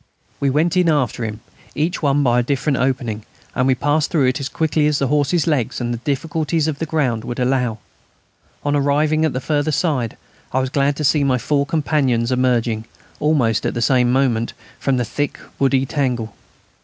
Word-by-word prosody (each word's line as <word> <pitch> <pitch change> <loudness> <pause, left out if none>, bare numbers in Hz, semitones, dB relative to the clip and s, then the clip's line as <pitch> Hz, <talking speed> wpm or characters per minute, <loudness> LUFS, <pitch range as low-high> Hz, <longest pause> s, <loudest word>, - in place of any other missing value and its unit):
We 140 - +1
went 155 +6 +1
in 180 -2 +3
after 140 -6 0
him, 110 0 -5 0.3
each 165 +4 -1
one 145 -1 +2
by 120 -2 +3
a - - +3
different 135 +2 0
opening, 125 -5 -1 0.3
and 125 - +1
we 130 - +3
passed 145 +3 +1
through 150 -5 +2
it 130 0 +1
as 135 -1 -3
quickly 155 -1 +1
as 150 -1 +1
the 135 -2 0
horses' 150 +2 +2
legs 145 -8 0
and 120 -1 -2
the 120 - -4
difficulties 155 +4 -1
of 150 -3 -3
the 160 - -2
ground 130 -8 0
would 120 +2 -5
allow. 125 -3 +1 0.9
On 145 0 +1
arriving 150 +2 +2
at 155 - 0
the 130 - -1
further 145 +2 0
side 140 - -1 0.4
I 130 - +2
was 130 0 -2
glad 140 0 +1
to 150 - -4
see 145 +1 +3
my 130 -2 +2
four 140 +4 0
companions 135 -6 +1
emerging, 120 -3 +1 0.3
almost 140 -8 +2
at - - -2
the - - -1
same 125 -1 +3
moment, 125 -3 +1 0.3
from 135 -2 +1
the 125 - 0
thick 145 +6 -3 0.2
woody 135 -1 +2
tangle. 125 -6 -2
135 Hz, 195 wpm, -20 LUFS, 125-150 Hz, 0.9 s, in